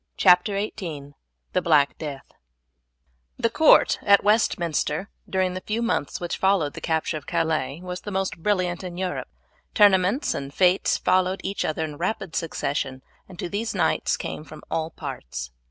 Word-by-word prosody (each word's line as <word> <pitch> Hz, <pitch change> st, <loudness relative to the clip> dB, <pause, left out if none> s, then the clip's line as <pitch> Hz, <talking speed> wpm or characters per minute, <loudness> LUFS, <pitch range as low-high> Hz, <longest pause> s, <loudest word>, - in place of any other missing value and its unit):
CHAPTER 185 Hz, +2 st, +5 dB
XVIII: 160 Hz, -9 st, -5 dB, 0.4 s
THE -, -, +2 dB
BLACK 150 Hz, -4 st, +3 dB
DEATH 145 Hz, -3 st, -6 dB, 1.1 s
The -, -, +1 dB
court -, -, +5 dB
at 200 Hz, -1 st, +5 dB
Westminster 185 Hz, -4 st, +1 dB, 0.2 s
during 185 Hz, -1 st, +1 dB
the 185 Hz, -, -5 dB
few 220 Hz, +4 st, -2 dB
months 230 Hz, -11 st, -1 dB
which 175 Hz, -1 st, -3 dB
followed 190 Hz, -7 st, +2 dB
the -, -, -8 dB
capture 160 Hz, -1 st, -1 dB
of 145 Hz, -, -11 dB
Calais 155 Hz, -2 st, -1 dB
was 180 Hz, 0 st, -5 dB
the -, -, -6 dB
most 190 Hz, -1 st, -2 dB
brilliant 185 Hz, -3 st, 0 dB
in 175 Hz, -1 st, -6 dB
Europe. 185 Hz, -1 st, -3 dB, 0.5 s
Tournaments 205 Hz, -, +4 dB
and 140 Hz, 0 st, -5 dB
fetes 180 Hz, +4 st, +3 dB
followed 185 Hz, +1 st, +2 dB
each 195 Hz, -, -2 dB
other 155 Hz, +1 st, -1 dB
in 150 Hz, -2 st, -8 dB
rapid 185 Hz, 0 st, -3 dB
succession, 140 Hz, -4 st, -2 dB, 0.3 s
and 185 Hz, -, -12 dB
to -, -, -3 dB
these 210 Hz, +5 st, -3 dB
knights -, -, +1 dB
came -, -, -5 dB
from 155 Hz, 0 st, -12 dB
all 160 Hz, 0 st, -1 dB
parts. -, -, -7 dB
180 Hz, 160 wpm, -24 LUFS, 155-195 Hz, 1.1 s, CHAPTER